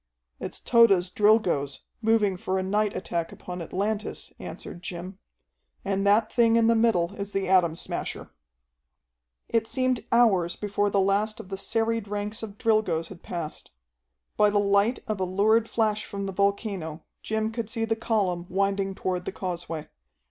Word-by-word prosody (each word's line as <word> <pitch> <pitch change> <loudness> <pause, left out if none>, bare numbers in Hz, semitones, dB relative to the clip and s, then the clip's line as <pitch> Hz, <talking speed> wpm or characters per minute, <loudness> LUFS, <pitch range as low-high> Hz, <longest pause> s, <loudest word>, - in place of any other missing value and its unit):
"It's - - -5
Tode's 200 -7 +4
Drilgoes, 185 -11 +2 0.2
moving 220 -3 +3
for 185 +1 -2
a 190 - 0
night 205 +2 0
attack 170 -3 -3
upon 180 -1 -7
Atlantis," 205 +5 -3
answered 175 - -8
Jim. 180 +2 -7 0.7
"And 195 0 0
that 215 +2 +3
thing 230 -2 +4
in 230 -1 +4
the 230 - +5
middle 220 -6 +2
is 200 -1 -5
the 195 -1 -1
Atom 180 -4 +4
Smasher." - - -4 1.2
It 225 -1 +1
seemed 255 0 0
hours 195 -8 +4
before 205 0 0
the 200 - +2
last 200 +3 +1
of 190 - -9
the 195 - -3
serried 225 +2 -1
ranks 210 +2 -3
of 210 -2 -7
Drilgoes 210 -8 +1
had 185 -3 -11
passed. 170 -4 -6 0.7
By 210 - +5
the 205 - +1
light 200 +4 +3
of 215 -2 -2
a - - +1
lurid 215 +5 +2
flash 215 -2 +1
from 200 0 -5
the 195 - -4
volcano 200 -5 -1 0.2
Jim 220 0 -1
could 225 -2 -4
see 225 -1 -1
the 225 0 0
column 195 -6 -1
winding 195 0 0
toward 180 -2 -2
the - - -3
causeway. 170 -4 -5
200 Hz, 165 wpm, -26 LUFS, 185-220 Hz, 1.2 s, the